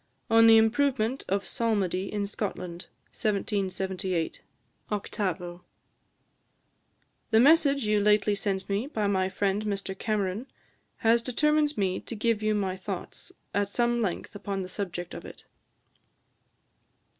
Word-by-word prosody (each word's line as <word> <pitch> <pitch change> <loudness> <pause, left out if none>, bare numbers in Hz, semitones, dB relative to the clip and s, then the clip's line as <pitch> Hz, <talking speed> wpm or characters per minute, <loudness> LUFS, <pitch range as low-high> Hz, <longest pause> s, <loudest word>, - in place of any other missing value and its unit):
on 225 0 +7
the 225 0 +9
Improvement 245 +2 +2
of 195 +1 0
Psalmody 195 -5 -1
in 205 -1 -1
Scotland. 185 -4 -5 0.3
1778, 190 -4 -1 0.5
8vo:" 180 -4 -3 1.7
"The 220 -1 +5
message 280 -1 +5
you 210 0 +3
lately 210 0 +3
sent 195 -1 -2
me, 205 +6 -1
by 220 -8 -2
my 190 -2 +1
friend 200 +2 0
Mr 195 -2 -3
Cameron, 210 +3 -2 0.5
has 230 +1 +3
determined 300 +4 +1
me 190 -2 0
to 235 - -7
give 220 0 +1
you 215 0 +1
my 190 -3 -1
thoughts 190 -1 -7 0.2
at 200 0 +1
some 240 +2 +1
length 190 -6 -3
upon 200 -1 -4
the - - -6
subject 175 -3 -5
of - - -7
it." - - -11
205 Hz, 125 wpm, -28 LUFS, 190-225 Hz, 1.7 s, the